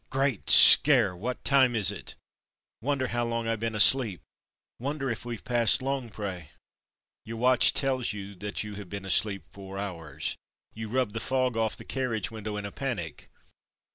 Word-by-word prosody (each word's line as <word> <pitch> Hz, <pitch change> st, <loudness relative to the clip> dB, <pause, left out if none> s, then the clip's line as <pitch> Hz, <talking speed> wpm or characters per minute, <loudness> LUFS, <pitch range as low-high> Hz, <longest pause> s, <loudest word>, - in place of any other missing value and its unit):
Great 135 Hz, -5 st, -1 dB
scare! 120 Hz, -10 st, +7 dB
What 120 Hz, +8 st, -5 dB
time 130 Hz, -3 st, +4 dB
is 105 Hz, -4 st, +2 dB
it.? -, -, -7 dB, 0.7 s
Wonder 135 Hz, 0 st, -1 dB
how 120 Hz, 0 st, -1 dB
long 115 Hz, -1 st, -2 dB
I've 115 Hz, -1 st, -1 dB
been 115 Hz, 0 st, -3 dB
asleep; 105 Hz, -2 st, +3 dB, 0.6 s
wonder 135 Hz, +1 st, -3 dB
if 115 Hz, -, -6 dB
weVe 120 Hz, -2 st, -6 dB
passed 120 Hz, -4 st, +3 dB
Longpre. 110 Hz, -, -4 dB, 0.8 s
Your 115 Hz, +1 st, -7 dB
watch 125 Hz, +1 st, +4 dB
tells 130 Hz, -4 st, -1 dB
you 100 Hz, -1 st, -7 dB
that 105 Hz, +3 st, -4 dB
you 105 Hz, -1 st, -7 dB
have 95 Hz, -, -12 dB
been 100 Hz, 0 st, -6 dB
asleep 100 Hz, +1 st, 0 dB
four 95 Hz, -1 st, -10 dB
hours. 80 Hz, -7 st, -5 dB, 0.4 s
You 110 Hz, 0 st, -7 dB
rub 125 Hz, -3 st, -1 dB
the 115 Hz, -, -3 dB
fog 130 Hz, +1 st, 0 dB
off 110 Hz, -1 st, 0 dB
the -, -, -11 dB
carriage 120 Hz, -7 st, -2 dB
window 110 Hz, -1 st, -6 dB
in 105 Hz, -, -5 dB
a 100 Hz, -, -6 dB
panic. 105 Hz, -, -5 dB
115 Hz, 170 wpm, -27 LUFS, 100-130 Hz, 0.8 s, scare